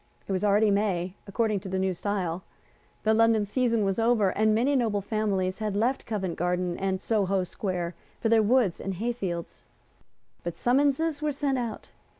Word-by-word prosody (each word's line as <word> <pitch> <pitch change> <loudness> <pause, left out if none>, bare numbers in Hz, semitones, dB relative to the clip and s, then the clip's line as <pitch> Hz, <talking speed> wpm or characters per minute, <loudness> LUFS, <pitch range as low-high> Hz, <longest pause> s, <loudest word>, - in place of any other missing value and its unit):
It - - -4
was 190 +1 0
already 210 +1 +4
May, 190 -3 0
according 215 0 0
to 190 - -8
the 190 - -1
New 190 0 +1
Style. 185 -2 -2 0.6
The 220 - +3
London 225 -1 +4
season 230 0 +1
was 195 +2 0
over; 225 -3 +3
and 215 +2 +2
many 260 +6 +2
noble 220 -6 +1
families 195 -2 -1
had 210 -2 -2
left 240 +6 0
Covent 190 -6 -2
Garden 180 0 0
and 190 -1 -1
Soho 195 -3 +1
Square 180 -3 -3 0.3
for - - 0
their 225 0 +5
woods 220 -4 +2
and 195 -1 -3
hayfields. 195 -5 -4 0.8
But 175 -1 -4
summonses 285 +4 +2
were 305 -1 0
sent 275 -2 -1
out. 235 -3 -5
210 Hz, 170 wpm, -27 LUFS, 190-230 Hz, 0.8 s, their